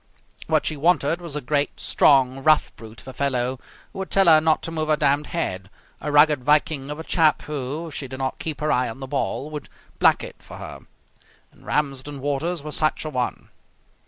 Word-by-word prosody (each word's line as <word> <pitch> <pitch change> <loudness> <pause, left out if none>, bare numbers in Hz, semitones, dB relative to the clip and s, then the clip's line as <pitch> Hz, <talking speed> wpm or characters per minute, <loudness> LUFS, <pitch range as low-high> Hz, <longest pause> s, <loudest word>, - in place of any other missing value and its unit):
What - - +2
she 155 - -1
wanted 165 +1 +1
was 170 -4 -7
a 150 - -3
great, 145 +2 -1
strong, 135 -1 +3
rough 155 +1 +3
brute 110 -1 -12
of - - -19
a 130 - -7
fellow 130 -1 -1 0.3
who 195 - -8
would 190 - -4
tell 195 -1 +3
her 160 -2 +7
not 160 0 +2
to 165 - -4
move 155 -1 -2
her 155 - +4
damned 145 0 +1
head; 95 - -3 0.3
a 150 - -4
rugged 145 -2 +5
Viking 150 -1 +2
of 150 - -5
a 160 - -6
chap 160 -3 +2
who, 150 +3 -4
if - - -12
she 135 +2 -4
did 130 +1 -7
not 130 0 -3
keep 155 -4 -4
her 155 - +1
eye 125 -1 +1
on 115 - -8
the 135 - -5
ball, 140 +2 -3
would 150 -2 -7 0.3
black - - +4
it - - -9
for - - -12
her. - - -8 0.7
And - - -20
Ramsden 140 -1 -2
Waters 145 +4 -2
was 150 0 -5
such 155 0 0
a 155 - -4
one. 125 -3 -3
145 Hz, 215 wpm, -23 LUFS, 135-155 Hz, 0.7 s, her